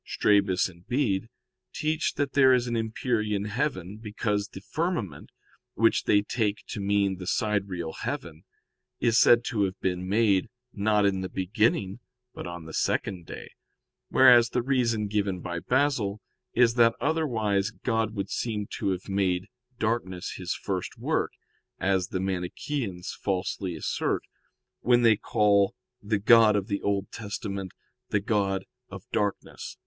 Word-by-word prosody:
Strabus 100 -3 +2
and 90 0 -16
Bede 115 -5 0 0.5
teach 155 +1 0
that 145 -1 -1
there 130 -2 +6
is 125 -1 0
an 120 -1 -2
empyrean 110 -2 -1
heaven, 105 - -2
because 105 -1 -2
the 95 - -10
firmament, 120 - -3 0.5
which 115 +2 +3
they 105 0 +4
take 105 -2 -1
to - - -4
mean 100 -1 +1
the 90 - -7
sidereal 95 -7 -1
heaven, 80 -1 -5 0.6
is 115 0 +3
said 120 0 +6
to 115 -4 -1
have 95 0 -5
been 90 0 -2
made, 105 -1 +2 0.2
not 105 0 +2
in 95 -1 +1
the 95 - -4
beginning, 100 +1 0 0.3
but - - -7
on 85 -2 -7
the 80 - -9
second 90 0 -1
day: - - -9 0.6
whereas 120 -3 +7
the 125 - -1
reason 120 -5 +1
given 100 -2 -1
by 85 0 -4
Basil 125 -5 +1 0.4
is 120 -1 +5
that 115 -1 +4
otherwise 110 -11 0
God 110 +1 -2
would 100 -1 -3
seem 105 -3 -2
to - - 0
have 90 +1 -7
made 95 -1 0 0.3
darkness 100 -5 -2
His 90 -2 -3
first 95 -3 -4
work, - - -1 0.4
as 95 -1 +1
the 95 - -3
Manicheans 95 - -3
falsely 95 -2 -2
assert, 80 - -1 0.6
when 120 0 +3
they 115 -2 +6
call 100 -1 +2 0.3
the 105 +1 0
God 110 +1 +6
of 100 -2 0
the 100 - -1
Old 100 -1 -1
Testament 100 -3 -5 0.4
the 105 - +2
God 100 -2 0 0.2
of - - -9
darkness. 105 -1 -3
105 Hz, 145 wpm, -27 LUFS, 95-115 Hz, 0.6 s, whereas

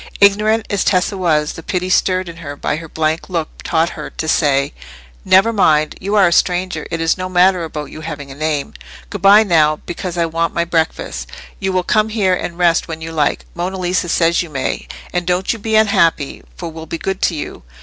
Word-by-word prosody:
Ignorant 210 +2 +4
as 200 - +1
Tessa 185 +1 +1
was, 155 -5 +1
the - - -9
pity 180 +2 -2
stirred 185 0 +2
in 170 -1 -8
her 145 -4 -7
by 145 - -2
his 165 +1 -8
blank 160 +3 -1
look 165 -4 -2
taught 165 0 +1
her 150 - -7
to 160 - -5
say— 140 -3 +2 0.5
"Never 195 +5 +4
mind: 155 -7 +3
you 200 +3 -2
are 195 -3 +6
a - - +1
stranger, 180 +1 0
it 165 - -3
is 165 +2 +1
no 185 0 -3
matter 185 0 +3
about 150 -2 -6
your 155 - -9
having 145 -3 -7
a - - -7
name. 150 0 -2 0.4
Good 205 -4 -5
bye 200 +3 +7
now, 155 -6 +3
because 175 0 -5
I 170 - +2
want 165 +1 -1
my 170 - +1
breakfast. 160 - -2 0.3
You 190 0 -1
will 185 -1 +1
come 215 +4 +2
here 205 -4 +1
and 170 -1 -3
rest 175 -2 +2
when 160 -1 -6
you 165 0 -6
like; 155 -2 0
Monna 180 +2 -3
Lisa 180 -1 -1
says 170 0 +2
you 170 - -6
may. 135 -3 -3 0.3
And 175 -1 -1
don't 180 +3 +1
you 230 - -8
be 220 +1 -1
unhappy, 195 -9 +2
for 170 - -6
we'll 160 0 -9
be 165 - -4
good 190 +2 -3
to 170 - +1
you." 150 - -6
170 Hz, 220 wpm, -17 LUFS, 160-185 Hz, 0.5 s, bye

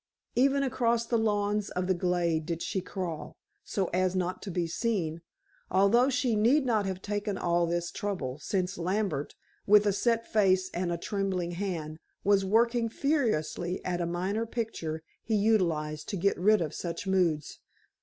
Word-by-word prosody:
Even 275 +2 +3
across 235 -3 +1
the 230 0 +1
lawns 210 -1 0
of 180 0 -2
the 185 - +2
glade 175 -3 0
did 170 -1 -2
she 190 - -2
crawl, 180 -4 -5 0.3
so 195 - -1
as 185 +1 +1
not 185 0 -1
to 205 - -6
be 175 -1 -1
seen, 170 -4 -1 0.5
although 200 +7 +4
she 255 -3 +1
need 250 +7 +4
not 215 -5 +1
have 190 0 -4
taken 205 -1 -2
all 170 -1 +1
this 170 0 -1
trouble, 155 -10 -3
since 185 +1 -2
Lambert, 180 -5 -1 0.3
with 210 +1 +6
a 205 - +3
set 230 +2 +1
face 190 -3 +2
and 175 0 -1
a 170 - -1
trembling 185 -2 -2
hand, 170 -4 -4 0.2
was 200 -1 +4
working 230 +3 +2
furiously 220 - 0
at 175 -1 -1
a 170 - -1
minor 190 +6 -1
picture 165 -10 -4 0.2
he 220 - 0
utilized 170 -8 +1
to 200 - -2
get 200 +3 +2
rid 210 +2 +4
of 155 -3 -2
such 170 +1 -4
moods. 180 -6 0
190 Hz, 165 wpm, -29 LUFS, 175-215 Hz, 0.5 s, with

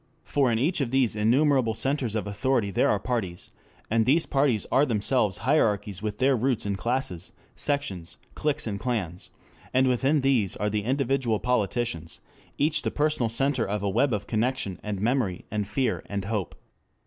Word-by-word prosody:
For 135 -4 +1
in 115 - +1
each 150 +7 +1
of 130 - 0
these 130 -3 +2
innumerable 120 +2 +3
centers 135 -3 -1
of 110 - -1
authority 105 +1 0
there - - +2
are 105 - +3
parties, 100 -8 -3 0.3
and 115 +1 +2
these 155 +5 +4
parties 135 -7 +1
are 135 - +4
themselves 110 -4 +1
hierarchies 105 - +1
with 105 -1 -3
their 135 +1 +3
roots 125 -1 0
in 100 -1 -1
classes, 95 -5 -2 0.2
sections, 120 - -2 0.2
cliques 150 -1 -1
and 100 -3 -3
clans; 100 -9 -3 0.5
and 130 0 +4
within 135 +4 +2
these 130 -8 +2
are 105 0 -1
the 105 -1 -1
individual 130 -3 +1
politicians, 115 -8 -1 0.4
each 150 +2 +2
the - - -1
personal 150 -6 0
center 130 +2 +1
of 105 0 -2
a 100 - +1
web 140 +8 +2
of 105 -2 -2
connection 115 -3 -1
and 105 -2 -4
memory 110 -4 0
and 105 -1 -2
fear 130 +3 -1
and 100 -1 -3
hope. 105 -4 -3
115 Hz, 170 wpm, -26 LUFS, 105-135 Hz, 0.5 s, these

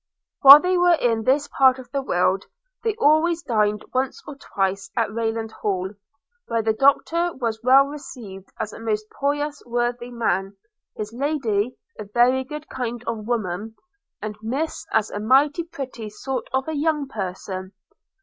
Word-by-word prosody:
While 280 +2 +12
they 360 +2 +1
were 355 -1 +5
in 230 -6 0
this 280 +3 +2
part 260 -1 +4
of 250 -2 -12
the 275 0 -1
world, 190 -4 +1 0.4
they 445 -2 0
always 335 -3 +3
dined 210 -2 0
once 260 +1 -1
or - - -6
twice 195 -6 -2
at 220 -3 0
Rayland 225 0 -2
Hall, 190 -3 -2 0.6
where 230 -1 0
the 220 0 +2
Doctor 325 +7 +2
was 230 -4 -3
well 265 +3 +6
received 245 -9 -9
as 215 - -4
a - - -9
most 215 -1 -2
pious 290 +1 -2
worthy 240 0 -2
man, 195 -5 -1 0.4
his 215 +1 -5
Lady 250 -4 -1 0.2
a - - -4
very 245 +5 +3
good 300 +3 -8
kind 240 -2 -4
of 225 -2 -4
woman, 220 -2 -3 0.5
and 210 0 -4
Miss 270 +9 -3
as 220 -1 +1
a 205 - -4
mighty 275 +8 +3
pretty 260 -9 -7
sort 255 +3 -5
of 265 +2 -1
a 315 - -2
young 300 -1 0
person. 190 -3 -5
240 Hz, 160 wpm, -23 LUFS, 215-280 Hz, 0.6 s, While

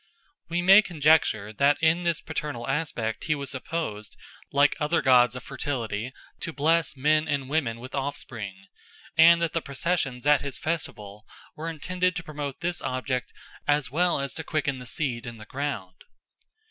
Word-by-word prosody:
We 175 +1 0
may 195 +3 +9
conjecture 150 - +2
that 140 +5 +3
in 160 +2 +3
this 170 -2 0
paternal 150 -6 -4
aspect 135 -6 -2
he 155 - +1
was 140 -1 -4
supposed, 130 -7 -4 0.3
like 140 +1 +4
other 155 +2 +2
gods 125 -2 +5
of 125 - -7
fertility, 120 -4 -3 0.3
to 165 - -4
bless 160 0 +1
men 155 +3 +2
and 140 -3 -1
women 130 -6 -1
with 130 +3 -10
offspring, 120 -8 -4 0.5
and 170 +1 +7
that 165 - -1
the 165 - 0
processions 140 -3 -2
at 145 -2 +5
his 140 -2 -5
festival 105 -10 -4 0.3
were 160 +2 -4
intended 180 +3 -1
to 175 - -4
promote 145 -3 -6
this 175 0 -2
object 130 -1 -2 0.4
as 145 -4 +2
well 175 +1 +2
as 140 -1 -3
to 160 - -6
quicken 140 -4 -1
the 125 - -9
seed 125 -4 -2
in 120 -1 -7
the 110 - -11
ground. 110 -10 -5
145 Hz, 165 wpm, -26 LUFS, 125-160 Hz, 0.5 s, may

